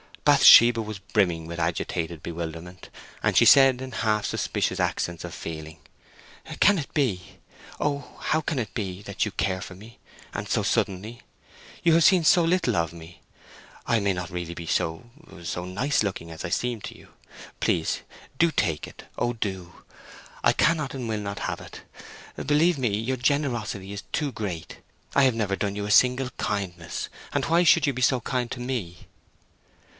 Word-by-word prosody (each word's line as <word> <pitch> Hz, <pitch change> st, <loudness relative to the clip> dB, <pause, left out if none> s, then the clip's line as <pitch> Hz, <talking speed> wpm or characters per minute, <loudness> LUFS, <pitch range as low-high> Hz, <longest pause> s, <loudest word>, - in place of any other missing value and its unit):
Bathsheba 115 Hz, -1 st, +8 dB
was 110 Hz, -1 st, -6 dB
brimming 95 Hz, -4 st, 0 dB
with 85 Hz, +1 st, -6 dB
agitated 85 Hz, -1 st, -2 dB
bewilderment, 85 Hz, +2 st, -7 dB, 0.3 s
and -, -, +1 dB
she -, -, +6 dB
said, 135 Hz, -2 st, +7 dB
in 130 Hz, 0 st, -6 dB
half 110 Hz, -2 st, 0 dB
suspicious -, -, -1 dB
accents 85 Hz, -1 st, -1 dB
of -, -, -7 dB
feeling, 80 Hz, -1 st, -7 dB, 0.8 s
"Can 205 Hz, -2 st, +5 dB
it 140 Hz, -, -6 dB
be! 110 Hz, -, -1 dB, 0.4 s
Oh, 145 Hz, -1 st, -3 dB
how 155 Hz, -, 0 dB
can 155 Hz, -1 st, -3 dB
it 110 Hz, -6 st, -3 dB
be, 95 Hz, -3 st, -4 dB
that 100 Hz, +2 st, -2 dB
you 105 Hz, -, -4 dB
care 95 Hz, -1 st, -1 dB
for 95 Hz, -, -8 dB
me, 110 Hz, +5 st, -14 dB, 0.3 s
and -, -, -4 dB
so -, -, 0 dB
suddenly! 105 Hz, +5 st, -1 dB, 0.6 s
You 170 Hz, -2 st, +5 dB
have 165 Hz, 0 st, +5 dB
seen 185 Hz, -3 st, +5 dB
so 170 Hz, +2 st, +5 dB
little 170 Hz, +1 st, +1 dB
of 85 Hz, -1 st, 0 dB
me: 85 Hz, 0 st, -13 dB, 0.6 s
I 115 Hz, -, +2 dB
may 100 Hz, -1 st, +1 dB
not 90 Hz, -2 st, -5 dB
be -, -, -15 dB
really 85 Hz, 0 st, -7 dB
so—so 90 Hz, -, -4 dB
nice 115 Hz, +11 st, 0 dB
looking 95 Hz, -5 st, -3 dB
as 80 Hz, +2 st, -7 dB
I -, -, -3 dB
seem 120 Hz, +4 st, -1 dB
to -, -, -8 dB
you. -, -, -17 dB, 0.5 s
Please, -, -, 0 dB, 0.4 s
do 170 Hz, -1 st, +4 dB
take 80 Hz, -, -1 dB
it; -, -, -13 dB
Oh, 120 Hz, 0 st, 0 dB
do! 95 Hz, -6 st, -5 dB, 0.6 s
I -, -, +5 dB
cannot 155 Hz, -5 st, +1 dB
and 125 Hz, -3 st, -4 dB
will 110 Hz, -1 st, -2 dB
not 100 Hz, -1 st, -5 dB
have -, -, -3 dB
it. -, -, -11 dB, 0.6 s
Believe 150 Hz, +4 st, +2 dB
me, 125 Hz, -3 st, +1 dB
your 120 Hz, +5 st, -2 dB
generosity 120 Hz, -8 st, -1 dB
is 100 Hz, 0 st, -6 dB
too 145 Hz, -2 st, -1 dB
great. 95 Hz, -8 st, -5 dB, 0.4 s
I 140 Hz, -, +4 dB
have 130 Hz, -3 st, +3 dB
never 105 Hz, -4 st, 0 dB
done 100 Hz, 0 st, -2 dB
you 100 Hz, 0 st, -3 dB
a 105 Hz, -, -2 dB
single 125 Hz, +3 st, +4 dB
kindness, 90 Hz, -5 st, -3 dB, 0.2 s
and -, -, 0 dB
why 170 Hz, +2 st, +3 dB
should 170 Hz, -2 st, +5 dB
you 140 Hz, -, +1 dB
be 130 Hz, -, -5 dB
so 130 Hz, 0 st, +3 dB
kind 125 Hz, 0 st, -2 dB
to 125 Hz, -, -5 dB
me?" 120 Hz, -9 st, -5 dB
105 Hz, 175 wpm, -25 LUFS, 90-130 Hz, 0.8 s, Bathsheba